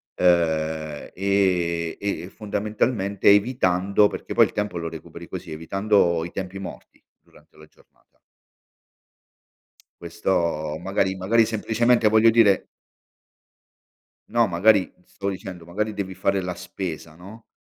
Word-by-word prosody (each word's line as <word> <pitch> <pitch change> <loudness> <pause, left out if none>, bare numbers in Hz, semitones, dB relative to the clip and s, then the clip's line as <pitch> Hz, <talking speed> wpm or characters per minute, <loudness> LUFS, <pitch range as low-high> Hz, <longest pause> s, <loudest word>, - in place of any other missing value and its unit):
ehm, 80 -3 0
e 90 -4 0
e, 100 -3 -3
fondamentalmente, 105 -1 0
evitando 100 -2 +3
perché - - -6
poi - - +6
il - - -7
tempo 105 -3 -3
lo 85 -1 -4
recuperi 80 -1 -10
così, - - -8
evitando 85 +1 +1
i 85 - -8
tempi 95 0 -6
morti 90 -3 -10 0.2
durante - - -23
la 75 - -14
giornata. 75 - -30 1.8
Questo 85 -4 -1
magari 95 +1 -1
magari 110 +5 +3
semplicemente 115 +1 +1
voglio 110 +1 +6
dire 110 -4 +4 1.6
No, 120 -1 +3
magari, 95 +2 +3
stavo 100 0 -4
dicendo, 95 -3 -8
magari 105 +5 -3
devi 95 -2 -4
fare 95 +1 0
la 90 0 -4
spesa, 90 -3 -7
no, 100 +7 -13
95 Hz, 120 wpm, -23 LUFS, 85-105 Hz, 1.8 s, poi